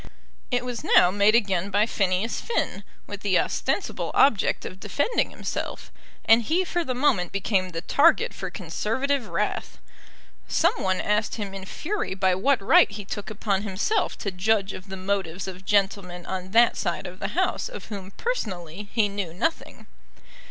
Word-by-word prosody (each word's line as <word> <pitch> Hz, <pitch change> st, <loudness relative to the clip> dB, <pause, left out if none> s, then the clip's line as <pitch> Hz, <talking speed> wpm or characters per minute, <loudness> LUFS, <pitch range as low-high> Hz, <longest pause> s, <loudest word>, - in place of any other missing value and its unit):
It 250 Hz, -1 st, 0 dB
was 245 Hz, -2 st, -4 dB
now 180 Hz, -, +5 dB
made 205 Hz, +3 st, +4 dB
again 195 Hz, -4 st, +1 dB
by 205 Hz, +2 st, +3 dB
Phineas 195 Hz, 0 st, 0 dB
Finn, 470 Hz, -, -2 dB, 0.2 s
with -, -, -7 dB
the -, -, +2 dB
ostensible -, -, -1 dB
object 235 Hz, -8 st, +3 dB
of 185 Hz, -, -8 dB
defending 285 Hz, -, 0 dB
himself, -, -, -5 dB, 0.3 s
and 225 Hz, +1 st, +6 dB
he 335 Hz, -, +1 dB
for 345 Hz, -1 st, -1 dB
the 255 Hz, -5 st, -3 dB
moment 245 Hz, -10 st, +2 dB
became 195 Hz, -1 st, 0 dB
the 165 Hz, -2 st, -5 dB
target 280 Hz, -, +3 dB
for -, -, -5 dB
Conservative 260 Hz, +3 st, -2 dB
wrath. -, -, -2 dB, 0.7 s
Some -, -, +3 dB
one 185 Hz, -1 st, +1 dB
asked 210 Hz, +1 st, 0 dB
him 205 Hz, -3 st, -5 dB
in 195 Hz, -1 st, -7 dB
fury 335 Hz, -, -3 dB
by 190 Hz, -1 st, +2 dB
what 255 Hz, +9 st, +2 dB
right -, -, +6 dB
he 205 Hz, -1 st, -7 dB
took 205 Hz, 0 st, -5 dB
upon 205 Hz, -2 st, -1 dB
himself 215 Hz, -, -1 dB
to 200 Hz, -, -3 dB
judge 195 Hz, +1 st, +1 dB
of 185 Hz, +1 st, -10 dB
the 190 Hz, -, -5 dB
motives 190 Hz, -2 st, -2 dB
of 190 Hz, 0 st, -8 dB
gentlemen 195 Hz, -3 st, 0 dB
on 185 Hz, 0 st, -4 dB
that 230 Hz, +4 st, +5 dB
side -, -, -2 dB
of -, -, -8 dB
the -, -, -4 dB
House -, -, 0 dB
of -, -, -9 dB
whom 195 Hz, -3 st, -6 dB
personally 200 Hz, -, -4 dB
he 220 Hz, -3 st, +2 dB
knew 200 Hz, -5 st, -4 dB
nothing. 325 Hz, -, -3 dB
200 Hz, 170 wpm, -25 LUFS, 190-235 Hz, 0.7 s, and